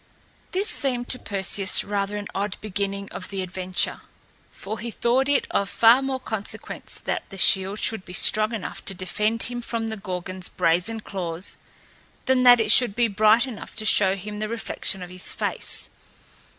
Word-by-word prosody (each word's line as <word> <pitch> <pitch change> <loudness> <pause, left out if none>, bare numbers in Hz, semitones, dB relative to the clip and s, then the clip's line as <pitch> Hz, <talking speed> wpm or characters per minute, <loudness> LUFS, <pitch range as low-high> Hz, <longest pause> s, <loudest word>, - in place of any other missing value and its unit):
This 390 +3 0
seemed 250 - -1
to 255 - +3
Perseus 195 -1 +2
rather 205 0 -2
an 205 - -5
odd 200 0 -3
beginning 200 -1 -3
of - - -6
the 195 -2 -3
adventure, 185 0 0 0.5
for 215 +3 -7
he 235 - -5
thought 250 +4 +1
it 285 - +2
of 200 0 0
far 235 +3 +5
more 270 -1 -2
consequence 220 -5 -6
that - - -3
the 195 - -10
shield 190 +2 +4
should 220 -2 -1
be 180 - -11
strong 215 +3 +4
enough 220 -5 -6
to 195 - -2
defend 210 +5 -1
him 240 0 -4
from 230 -1 -3
the 220 - -5
Gorgon's 185 -1 -5
brazen 180 +7 0
claws 180 -3 -5 0.7
than 260 -1 +2
that 245 -1 +7
it 215 -1 +1
should 235 -4 +5
be 240 0 +2
bright 215 +3 +4
enough 250 -5 -9
to 215 - -4
show 195 -2 +5
him 210 +2 -7
the 215 0 -3
reflection 225 -4 -3
of 180 - -10
his 185 0 -1
face. - - -2
210 Hz, 175 wpm, -24 LUFS, 190-230 Hz, 0.7 s, that